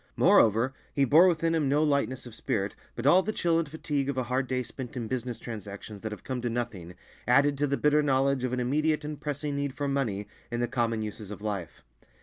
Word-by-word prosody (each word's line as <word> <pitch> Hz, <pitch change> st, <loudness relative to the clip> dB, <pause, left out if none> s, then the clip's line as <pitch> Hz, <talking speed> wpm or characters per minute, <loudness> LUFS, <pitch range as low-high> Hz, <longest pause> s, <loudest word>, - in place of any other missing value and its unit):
Moreover, 115 Hz, +4 st, +4 dB, 0.2 s
he 140 Hz, -, +4 dB
bore 160 Hz, +8 st, +7 dB
within 165 Hz, -1 st, +2 dB
him 155 Hz, -4 st, +1 dB
no 145 Hz, +2 st, +3 dB
lightness 140 Hz, -4 st, 0 dB
of 120 Hz, -, -10 dB
spirit, 105 Hz, -5 st, -2 dB, 0.2 s
but 120 Hz, -, -5 dB
all 175 Hz, +6 st, +7 dB
the 215 Hz, -, -2 dB
chill 170 Hz, -5 st, +1 dB
and 160 Hz, -3 st, -2 dB
fatigue 145 Hz, -2 st, -2 dB
of 140 Hz, -, -2 dB
a 130 Hz, -, +1 dB
hard 130 Hz, +2 st, -1 dB
day 125 Hz, 0 st, -1 dB
spent 130 Hz, +2 st, -8 dB
in 115 Hz, -2 st, -3 dB
business 125 Hz, -1 st, -3 dB
transactions 105 Hz, -2 st, -8 dB
that 110 Hz, -, -4 dB
have 105 Hz, -, -8 dB
come 130 Hz, -2 st, -3 dB
to 120 Hz, -, -1 dB
nothing, 115 Hz, -8 st, -4 dB, 0.3 s
added 140 Hz, +4 st, +4 dB
to 145 Hz, -, +2 dB
the 140 Hz, 0 st, 0 dB
bitter 150 Hz, 0 st, +3 dB
knowledge 135 Hz, -2 st, +2 dB
of 125 Hz, -, -1 dB
an 125 Hz, -, -1 dB
immediate 150 Hz, +5 st, +1 dB
and 150 Hz, -1 st, -6 dB
pressing 145 Hz, -1 st, -3 dB
need 140 Hz, -1 st, -2 dB
for 145 Hz, 0 st, -2 dB
money 115 Hz, -8 st, -1 dB, 0.2 s
in 120 Hz, -, -3 dB
the 120 Hz, -, +1 dB
common 115 Hz, -2 st, 0 dB
uses 105 Hz, -1 st, -7 dB
of 105 Hz, 0 st, -8 dB
life. 100 Hz, -6 st, -4 dB
130 Hz, 230 wpm, -28 LUFS, 115-145 Hz, 0.3 s, bore